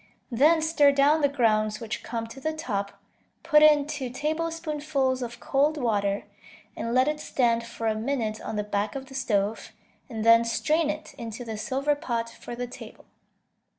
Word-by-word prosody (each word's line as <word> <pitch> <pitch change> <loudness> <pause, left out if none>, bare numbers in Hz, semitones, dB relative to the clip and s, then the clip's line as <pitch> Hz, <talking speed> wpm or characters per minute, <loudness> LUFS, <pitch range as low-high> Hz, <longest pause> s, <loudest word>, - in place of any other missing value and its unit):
Then 310 +7 +4
stir 305 -3 +4
down 285 +3 +3
the 285 - +3
grounds 215 -5 +1
which 225 -2 -5
come 230 -1 -4
to 230 +4 -11
the 315 +4 -2
top, 205 -11 -4 0.4
put 305 -2 +5
in 300 -2 +6
two 290 -4 -4
tablespoonfuls 300 -2 -2
of 240 -1 -6
cold 290 +5 +1
water, 205 -6 0 0.5
and 230 - -3
let 255 +3 +3
it 300 0 -1
stand 235 -5 +1
for 230 -1 -7
a 220 - +2
minute 220 -1 -2
on - - -5
the 210 - -1
back 205 +1 -2
of 270 -1 -5
the 270 - -14
stove, 220 -5 -1 0.4
and 220 -3 -4
then 230 0 +7
strain 305 +7 +1
it 305 0 -5
into 230 +1 -6
the 225 -1 -5
silver 270 +7 0
pot 235 -6 -3
for 240 - -9
the 245 +1 -3
table. 245 - -12
255 Hz, 180 wpm, -26 LUFS, 225-295 Hz, 0.5 s, then